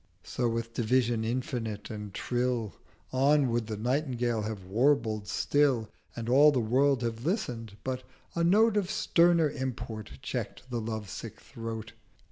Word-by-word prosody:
So 120 -2 -1
with 115 0 -3
Division 120 -1 +1
infinite 115 -3 -3
and 105 -2 -6
Trill 120 +1 -1 0.4
220 130 +1 0 0.2
On - - 0
would 115 -2 0
the 110 -1 -4
Nightingale 120 -1 0
have 105 -2 -4
warbled 110 -1 +2
still, 135 -6 +2 0.2
And 115 -1 -5
all 145 +5 +7
the 135 - +1
World 130 +3 +2
have 115 0 -3
listen'd; 120 - -2
but 130 -1 -2 0.3
a 170 - 0
Note 210 +5 +5
Of 195 -3 0
sterner 170 -5 +3
Import 120 -5 -5
check'd - - -4
the 120 -2 -1
lovesick 110 -3 -5
Throat. 115 -1 -7
120 Hz, 145 wpm, -29 LUFS, 110-135 Hz, 0.4 s, all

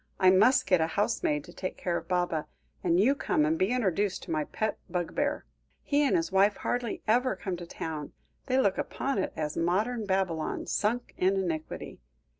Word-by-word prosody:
"I 185 0 +6
must 250 +7 +5
get 180 -3 +3
a 160 - +2
housemaid 165 -7 0
to 175 - -13
take 185 - -5
care 175 -2 -1
of - - -4
Baba; 175 -4 0 0.4
and 175 0 +3
you 240 +8 +5
come 155 - +1
and 155 +1 +2
be 185 +4 +1
introduced 205 -5 0
to - - -7
my 155 -2 0
pet 215 +7 -2
bugbear. 280 - -1 0.4
He 290 0 +2
and 290 +4 +3
his 335 -1 0
wife 200 +2 +4
hardly 245 -3 -2
ever 250 +4 +3
come 190 -3 -4
to 175 0 -8
town. 155 -3 -5 0.3
They 255 - +2
look 200 -7 +2
upon 275 -6 -2
it 190 - -1
as 150 -1 -3
modern 210 +7 0
Babylon, 190 -5 -1
sunk 230 +4 -1
in 190 +2 +3
iniquity. 165 -5 -3
190 Hz, 190 wpm, -29 LUFS, 170-235 Hz, 0.4 s, I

